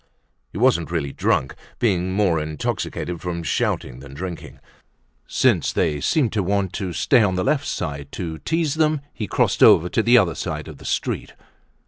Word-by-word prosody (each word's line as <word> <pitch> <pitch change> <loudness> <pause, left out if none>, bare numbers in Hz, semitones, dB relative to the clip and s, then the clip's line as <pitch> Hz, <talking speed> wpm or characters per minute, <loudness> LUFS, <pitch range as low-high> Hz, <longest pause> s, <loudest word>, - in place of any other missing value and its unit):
He - - -8
wasn't 115 -8 +2
really 80 -5 -2
drunk, 65 - 0 0.2
being 95 -5 +1
more 95 -4 +2
intoxicated 80 +2 -3
from 85 -1 -4
shouting 65 -5 -1
than 70 0 -11
from - - -11
drinking. 90 -1 -7 0.7
Since - - +2
they 75 -3 0
seemed 130 - +1
to 105 - +1
want 100 0 -1
to 95 -2 -3
stay 120 - +3
on 95 -3 +2
the 90 - 0
left 140 +4 0
side, 70 -4 -4
to 80 -4 -5
tease 160 -3 0
them, 155 -2 +1
he 105 - -4
crossed - - +1
over 85 +3 +7
to 110 - +1
the 120 +2 +5
other 95 -8 +3
side - - -5
of - - -10
the - - -13
street. - - -2
90 Hz, 180 wpm, -22 LUFS, 80-110 Hz, 0.7 s, over